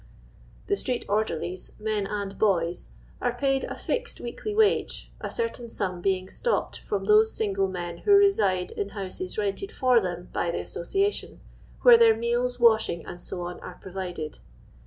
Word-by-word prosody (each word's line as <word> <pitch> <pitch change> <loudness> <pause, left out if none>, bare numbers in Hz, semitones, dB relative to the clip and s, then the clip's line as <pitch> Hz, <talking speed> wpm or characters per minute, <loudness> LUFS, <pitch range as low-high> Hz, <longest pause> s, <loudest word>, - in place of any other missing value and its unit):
* - - -25
The 405 - +1
street 250 -10 -2
orderlies, 185 -4 -2
men 210 -2 -1
and 200 -1 -4
boys, 175 -5 +1 0.3
are 245 -1 0
paid 270 0 +1
a - - -5
fixed 475 -1 -3
weekly 245 - -5
wiwe, 420 0 +1
a - - -4
certain 460 - -3
sum 185 -5 -2
being 185 0 0
stopped 475 - -1
from - - -3
those 435 +1 +5
single 195 -2 0
men 175 -2 -5
who 410 - +3
reside 205 - +3
in 200 - -3
houses 185 -1 -5
rented 210 - -2
for 255 - +4
them 175 -2 -4
by 175 - 0
the 170 - -1
association, 395 - -2 0.4
where 485 -2 +10
their 455 -1 +6
meals, 245 +1 0
washing, 220 -8 +4
Kc, 175 0 -6
are - - -9
provided. 180 -5 -6
210 Hz, 155 wpm, -26 LUFS, 185-270 Hz, 0.4 s, where